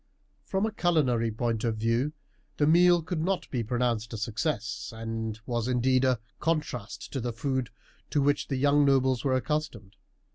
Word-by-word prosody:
From 195 +2 0
a 220 - -1
culinary 135 - +2
point 115 0 -2
of 115 -2 0
view 115 +7 0 0.4
the 145 - +3
meal 175 +2 +5
could 160 0 -3
not 185 +3 -1
be 125 - 0
pronounced 120 -1 -1
a - - -3
success, 115 +1 -2
and 110 -1 -4
was, 120 -1 -1
indeed, 130 +1 +2
a 130 -3 +2 0.2
contrast 150 -9 -3
to 135 - -2
the 120 +1 -2
food 130 +1 -2 0.4
to 150 - +1
which 145 +1 +1
the 135 - -1
young 145 +2 +4
nobles 130 -2 +3
were 135 -2 +2
accustomed. 130 -8 -3
130 Hz, 170 wpm, -28 LUFS, 115-150 Hz, 0.4 s, meal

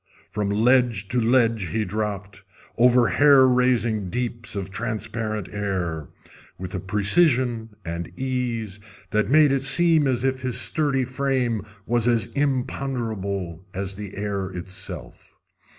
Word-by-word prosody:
From 105 -1 -2
ledge 115 -1 +2
to 125 +2 +1
ledge 115 -4 +2
he 105 +7 -1
dropped, 100 0 -4 0.3
over 120 0 +4
hair 140 -2 +6
raising 120 -5 +1
deeps 120 +1 -4
of 95 -1 -4
transparent 110 -2 -4
air, 90 -7 -3 0.5
with 90 0 -7
a 95 - -2
precision 115 - +1
and 85 0 -4
ease 120 -6 -3 0.3
that 105 -1 +1
made 150 0 +5
it 135 -1 +1
seem 155 +2 +5
as 125 -2 0
if 130 -1 0
his 130 -2 0
sturdy 140 -4 +1
frame 130 -4 -1 0.2
was 120 0 +1
as 115 -2 +2
imponderable 115 - -2
as 95 0 -3
the 100 -1 -8
air 100 -1 -2
itself. 95 +1 -8
115 Hz, 130 wpm, -23 LUFS, 100-130 Hz, 0.5 s, hair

